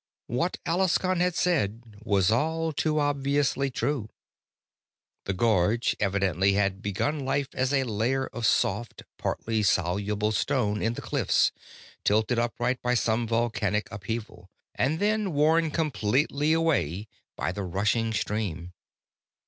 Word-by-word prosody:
What 130 +10 -1
Alaskon 185 +1 +1
had 180 -1 +1
said 115 - -1
was 100 -4 +2
all 160 +6 0
too 155 +1 0
obviously 140 -1 +1
true. 125 -2 -2 1.2
The 95 - -1
gorge 110 +2 +2
evidently 95 -1 +1
had 100 -1 0
begun 140 +9 -1
life 135 +1 -1
as 130 +1 0
a 135 -2 +2
layer 125 +3 0
of 115 -2 -2
soft, 105 +3 0 0.2
partly 110 -1 -1
soluble 100 +3 +1
stone 110 -3 0
in 115 +1 0
the - - -7
cliffs, - - +2 0.5
tilted 110 +3 +2
upright 120 +1 -1
by 125 0 +1
some 115 0 +1
volcanic 110 -3 0
upheaval, 105 -3 -6 0.2
and 140 +6 0
then 210 -1 0
worn 160 +3 +3
completely 145 - 0
away 110 - +1 0.3
by - - -2
the 105 - -5
rushing 105 +5 0
stream. 100 -5 -3
115 Hz, 125 wpm, -27 LUFS, 105-145 Hz, 1.2 s, worn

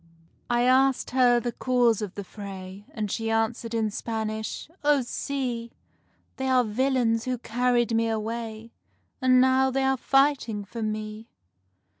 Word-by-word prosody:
I 240 0 +2
asked 260 +1 +3
her 245 -1 +4
the 240 0 -3
cause 240 -3 +2
of 205 -3 -5
the 200 - -5
fray, 195 0 -9
And 210 -3 -3
she 225 0 -2
answered 225 +1 -1
in 220 -2 0
Spanish: 220 0 -4 0.2
"Oh 290 -2 +3
see! 245 -2 -3 0.6
They 265 - -2
are 255 -1 +4
villains 235 0 +1
who 255 -1 -1
carried 240 0 +1
me 225 0 +2
away, 225 0 -4 0.5
And 255 -1 +5
now 260 +1 +4
they 270 +1 0
are 265 0 +2
fighting 270 -6 +1
for 230 +3 -7
me." 215 +1 -4
235 Hz, 145 wpm, -26 LUFS, 220-255 Hz, 0.6 s, And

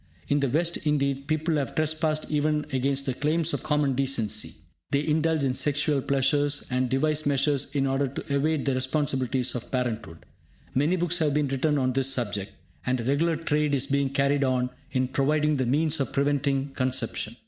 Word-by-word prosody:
In 145 - +3
the 140 -2 +1
West 170 +6 +1
indeed, 140 -2 -1
people 155 +1 0
have 135 -4 -3
trespassed 155 0 0
even 150 0 +1
against 135 +1 0
the 130 - -1
claims 155 +5 0
of - - -2
common 150 -2 +1
decency. 125 -6 -1 0.3
They 140 +1 0
indulge 160 0 +1
in 130 -2 +1
sexual 145 +2 +1
pleasures, 140 +2 +1
and 125 0 +1
devise 150 +3 +1
measures 140 0 +1
in 135 -1 +2
order 135 +1 +1
to 140 +2 -4
evade 150 +1 +1
the 135 - +1
responsibilities 130 -1 0
of 120 -1 -5
parenthood. 115 -9 -3 0.5
Many 145 +7 +2
books 175 0 0
have 150 -3 +1
been 150 -2 +1
written 145 +3 +1
on 130 -2 +1
this 135 +1 +2
subject, 105 -6 -2 0.3
and 125 0 0
a - - -3
regular 150 +6 +1
trade 150 -2 0
is 135 0 0
being 140 -1 +1
carried 140 +1 +1
on 125 -1 0 0.2
in 130 0 +1
providing 150 +3 +1
the 130 -2 0
means 150 +4 +1
of 135 - -1
preventing 140 -1 +1
conception. 125 -4 -2
140 Hz, 180 wpm, -26 LUFS, 130-150 Hz, 0.5 s, In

